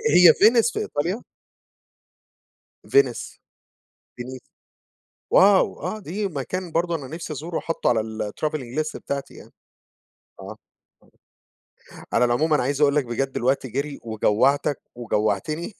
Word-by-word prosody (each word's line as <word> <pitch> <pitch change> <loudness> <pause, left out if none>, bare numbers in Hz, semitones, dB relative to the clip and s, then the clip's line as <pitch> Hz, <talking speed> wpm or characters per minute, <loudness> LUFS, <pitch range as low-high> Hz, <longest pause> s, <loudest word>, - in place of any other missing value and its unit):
هي 175 -3 +9
فينيس 230 +2 +4
في - - -3
إيطاليا؟ 175 +10 -2 1.7
فينيس؟ 415 0 +1 0.8
فينيس؟ 125 +1 -7 0.9
واو! 195 0 +5
آه، 215 - -4
دي 200 +2 -3
مكان 175 +3 -5
برضه 170 +1 0
أنا 140 -4 -6
نفسي 160 0 -6
أزوره 165 +4 -4
حاطه 165 - -3
على 115 -2 +2 0.3
الtravelling 150 -3 -3
list 155 0 -2
بتاعتي 140 -1 -5
يعني - - -14 0.9
آه. - - -8 1.6
على 125 - +4
العموم 145 +7 +1
أنا 145 - +3
عايز 140 +3 -1
أقول 145 0 +4
لك 145 -4 +2
بجد 135 +3 -2
الوقت 130 +1 0
جري، 140 +4 -4
وجوّعتك 115 +6 +1
وجوعتني، 120 - -2
145 Hz, 120 wpm, -23 LUFS, 130-170 Hz, 1.7 s, هي